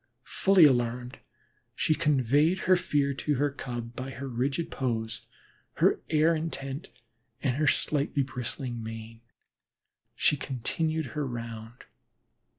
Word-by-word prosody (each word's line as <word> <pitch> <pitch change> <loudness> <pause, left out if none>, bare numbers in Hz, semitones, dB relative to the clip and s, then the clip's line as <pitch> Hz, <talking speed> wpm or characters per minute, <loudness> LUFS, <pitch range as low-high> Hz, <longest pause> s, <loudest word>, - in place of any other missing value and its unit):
Fully 190 -4 +5
alarmed, 125 -1 +1 0.6
she 155 - +2
conveyed 150 +2 +3
her 185 - +5
fear 145 -6 +1
to 145 +3 -1
the 145 +2 +2
Cub, 120 -3 -6
by 130 +1 -5
her 135 +2 -6
rigid 135 +7 -1
pose, 110 -4 -3 0.5
her - - +3
air 160 +1 +4
intent, 155 0 -4 0.5
and 130 -2 +1
her 150 0 +2
slightly 145 -1 +1
bristling 125 -1 -4
mane. 115 0 -8 0.9
She 150 - +3
continued 155 +5 -1
her 150 -2 -2
round. 115 -1 -7
135 Hz, 120 wpm, -28 LUFS, 120-150 Hz, 0.9 s, Fully